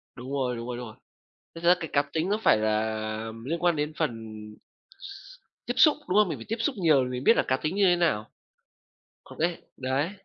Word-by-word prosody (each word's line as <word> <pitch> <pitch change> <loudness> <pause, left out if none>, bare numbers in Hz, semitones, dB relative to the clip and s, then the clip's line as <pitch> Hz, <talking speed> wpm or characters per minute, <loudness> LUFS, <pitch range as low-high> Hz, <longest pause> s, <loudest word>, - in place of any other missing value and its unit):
Đúng 125 +2 -8
rồi, 130 -3 -1
đúng 115 0 -6
rồi, 125 -1 -4
đúng 125 - -6
rồi. 110 - -12 0.6
Thực 165 0 -9
ra 175 +1 +7
cái 160 - -5
cá 140 - +4
tính 160 +3 -1
nó 210 +2 +1
phải - - +6
là 110 0 +1 0.6
liên 165 +6 -2
quan 175 -2 +3
đến 150 +1 -2
phần 155 -4 +1 1.6
tiếp 245 - -1
xúc, 295 +3 +6
đúng 185 - +1
không? 210 - +4
Mình - - -3
phải - - -10
tiếp 225 - -1
xúc 255 +5 0
nhiều 155 -8 +4
mình 125 0 -4
biết 230 - +5
là - - +3
cá 130 - +2
tính 155 +6 -3
như 200 0 +3
thế 180 -1 +5
nào? 110 -12 0 1.0
Còn - - -14
cái 170 +1 -1
đấy. 135 +5 -1
155 Hz, 225 wpm, -27 LUFS, 125-175 Hz, 1.6 s, ra